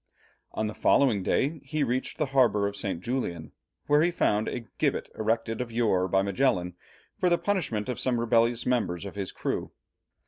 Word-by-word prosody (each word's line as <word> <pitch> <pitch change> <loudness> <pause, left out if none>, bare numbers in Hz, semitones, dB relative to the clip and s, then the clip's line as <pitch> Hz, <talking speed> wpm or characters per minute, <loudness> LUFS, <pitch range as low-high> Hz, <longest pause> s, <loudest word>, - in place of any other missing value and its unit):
On 110 - -1
the 105 - -3
following 120 -6 +3
day 145 - 0
he 145 +2 -1
reached 130 0 -2
the 150 - +1
harbour 110 -7 +4
of 100 0 -2
St. 95 -4 -3
Julian, 90 -9 -3 0.3
where 145 +1 +4
he 170 - +3
found 110 -11 +1
a 120 -2 -4
gibbet - - 0
erected 115 +1 -1
of 120 -2 -5
yore 110 -6 +2
by 95 +1 +2
Magellan 100 -4 +1 0.5
for 180 - +3
the 175 - +3
punishment 170 - -1
of 125 - -3
some 125 -2 0
rebellious 115 0 +2
members 105 -8 0
of 100 - -6
his 100 -2 -4
crew. - - -3
115 Hz, 180 wpm, -27 LUFS, 100-130 Hz, 0.5 s, harbour